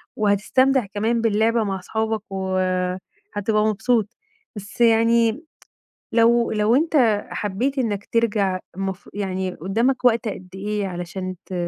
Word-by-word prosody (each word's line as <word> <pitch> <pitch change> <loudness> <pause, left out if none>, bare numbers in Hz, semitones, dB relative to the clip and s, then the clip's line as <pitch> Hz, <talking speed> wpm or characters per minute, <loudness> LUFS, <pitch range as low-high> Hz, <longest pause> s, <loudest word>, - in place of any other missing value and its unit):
وهتستمتع 230 +5 +2
كمان 220 +4 -1
باللعبة 225 +1 +2
مع 195 -2 -2
اصحابك، 220 +3 -2
و 190 -1 -2 0.8
هتبقى 210 +1 +1
مبسوط 220 +1 +1 0.5
بس 205 +3 -8
يعني 230 +3 +3 0.7
لو 235 +1 +3
لو 215 +2 +2
أنت 260 -9 +3
حبييت 225 +8 -2
إنّك 210 -6 -1
ترجع 210 -5 +1 0.2
المف 195 0 -4
يعني 190 -2 -2
قدّامك 235 - 0
وقت 235 -1 +3
قد 185 -3 -6
إيه 205 +1 -2
علشان 185 +1 -5
ت 185 - -9
215 Hz, 125 wpm, -22 LUFS, 195-235 Hz, 0.8 s, يعني